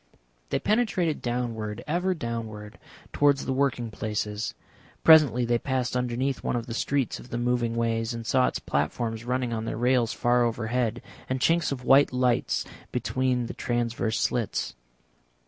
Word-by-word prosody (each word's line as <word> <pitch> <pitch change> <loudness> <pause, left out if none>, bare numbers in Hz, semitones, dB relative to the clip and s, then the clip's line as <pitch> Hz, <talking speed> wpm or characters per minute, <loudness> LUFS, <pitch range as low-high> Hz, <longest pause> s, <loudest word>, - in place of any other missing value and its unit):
They - - +1
penetrated 205 -8 +1
downward, 115 -4 -3
ever 180 +4 0
downward, 110 -6 -6 0.3
towards 145 -1 +3
the 130 - -1
working 130 -4 0
places. 105 0 -3 0.5
Presently 150 -6 +7
they 120 0 +1
passed 130 -2 -1
underneath 125 +2 -1
one - - -1
of 120 -1 -2
the 115 - -6
streets 130 +4 -1
of 125 - -13
the 120 - -3
moving 120 -1 0
ways, 115 -1 0
and 115 -1 -5
saw 130 +2 +3
its - - -2
platforms 110 - -2
running 125 -1 -1
on 110 0 -3
their 115 - -3
rails 120 -1 +2
far 120 0 +2
overhead, 120 0 -1 0.3
and 130 0 0
chinks 165 +4 +2
of 130 -2 -4
white 135 +3 +5
lights 125 -1 +1 0.3
between 130 -2 0
the - - -6
transverse 120 -2 -1
slits. 120 -4 -1
120 Hz, 155 wpm, -27 LUFS, 115-130 Hz, 0.5 s, Presently